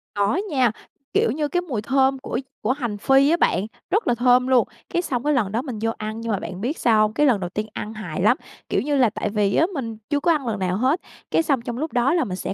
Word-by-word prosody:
Có 205 Hz, +7 st, +2 dB
nha. 255 Hz, -6 st, +3 dB, 0.4 s
Kiểu -, -, +3 dB
như, 295 Hz, +2 st, -1 dB
cái 355 Hz, +3 st, 0 dB
mùi 255 Hz, -12 st, -3 dB
thơm 265 Hz, +2 st, +2 dB
của 260 Hz, -, -3 dB, 0.2 s
của 230 Hz, -, +1 dB
hành 240 Hz, -7 st, -2 dB
phi 270 Hz, +6 st, +4 dB
á 340 Hz, -, +3 dB
bạn, 185 Hz, -, +2 dB, 0.2 s
rất 420 Hz, +3 st, +1 dB
là 240 Hz, -, +3 dB
thơm 250 Hz, +1 st, +4 dB
luôn, 255 Hz, -2 st, +4 dB, 0.2 s
cái 345 Hz, -, 0 dB
xong 255 Hz, -7 st, -2 dB
cái 300 Hz, 0 st, +2 dB
lần 210 Hz, -7 st, +1 dB
đó 230 Hz, +3 st, 0 dB
mình 250 Hz, -7 st, -6 dB
vô 225 Hz, 0 st, +1 dB
ăn 215 Hz, +1 st, -5 dB
nhưng 230 Hz, -1 st, -3 dB
mà 200 Hz, -, 0 dB
bạn 185 Hz, 0 st, -7 dB
biết 270 Hz, +8 st, -2 dB
sao 220 Hz, -3 st, +3 dB
hông? 215 Hz, 0 st, +2 dB
Cái 295 Hz, +4 st, +2 dB
lần 240 Hz, -7 st, +3 dB
đầu 175 Hz, -1 st, -4 dB
tiên 215 Hz, +3 st, -3 dB
ăn 215 Hz, +1 st, -5 dB
hài 180 Hz, -6 st, -5 dB
lắm, 230 Hz, +7 st, +4 dB, 0.3 s
kiểu -, -, +1 dB
như 290 Hz, +1 st, 0 dB
là, 245 Hz, -4 st, +4 dB
tại 210 Hz, -, -3 dB
vì 205 Hz, -1 st, +1 dB
á 325 Hz, -, +4 dB
mình 230 Hz, -6 st, -4 dB
chưa 290 Hz, -, +1 dB
có 340 Hz, -, +2 dB
ăn 285 Hz, -6 st, 0 dB
lần 210 Hz, -3 st, -2 dB
nào 185 Hz, 0 st, 0 dB
hết, 265 Hz, +9 st, +1 dB, 0.3 s
cái 330 Hz, -, +3 dB
xong 275 Hz, -6 st, +1 dB
trong 240 Hz, 0 st, -5 dB
lúc 310 Hz, +1 st, -3 dB
đó 245 Hz, +5 st, +2 dB
là 335 Hz, -, +2 dB
mình 185 Hz, -, -4 dB
sẽ -, -, -3 dB
245 Hz, 285 wpm, -23 LUFS, 215-275 Hz, 0.4 s, phi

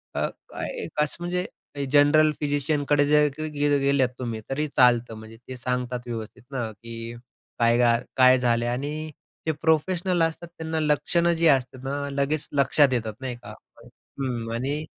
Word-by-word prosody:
अ, -, -, +1 dB, 0.2 s
काय -, -, -5 dB
एक 150 Hz, -, -3 dB
असं 150 Hz, -, -4 dB
म्हणजे 180 Hz, +1 st, -1 dB, 0.5 s
जनरल 150 Hz, +1 st, +5 dB
फिजिशियन 145 Hz, 0 st, 0 dB
कडे 145 Hz, -1 st, +4 dB
जर 150 Hz, 0 st, +5 dB
की 155 Hz, 0 st, -3 dB
गेल 145 Hz, 0 st, +3 dB
गेलेत 140 Hz, -2 st, +2 dB
तुम्ही, 115 Hz, -3 st, -3 dB
तरी 150 Hz, +3 st, -1 dB
चालतं 120 Hz, -4 st, +3 dB
म्हणजे 110 Hz, +1 st, -11 dB
ते 130 Hz, -, -7 dB
सांगतात 125 Hz, 0 st, -3 dB
व्यवस्थित 115 Hz, -2 st, -6 dB
ना 120 Hz, -5 st, -3 dB
की 115 Hz, +2 st, -8 dB, 0.5 s
काय 115 Hz, 0 st, +4 dB
घाल 120 Hz, 0 st, +3 dB
काय 130 Hz, 0 st, +7 dB
झाले 120 Hz, -1 st, +1 dB
आणि 145 Hz, +5 st, -3 dB, 0.3 s
ते 160 Hz, -, +2 dB
प्रोफेशनल 170 Hz, +3 st, +1 dB
असतात 165 Hz, +1 st, -2 dB
त्यांना 160 Hz, 0 st, -2 dB
लक्षणं 170 Hz, +3 st, +2 dB
जी 165 Hz, 0 st, +3 dB
असतात 130 Hz, -3 st, +2 dB
ना 140 Hz, +1 st, -3 dB
लगेच 140 Hz, +2 st, -1 dB
लक्षात 140 Hz, -1 st, +4 dB
येतात, 110 Hz, -3 st, -2 dB
नाही 130 Hz, -2 st, -4 dB
का? -, -, -10 dB, 0.7 s
हं 120 Hz, -4 st, -3 dB
आणि 140 Hz, +6 st, -2 dB
140 Hz, 165 wpm, -25 LUFS, 120-150 Hz, 0.7 s, काय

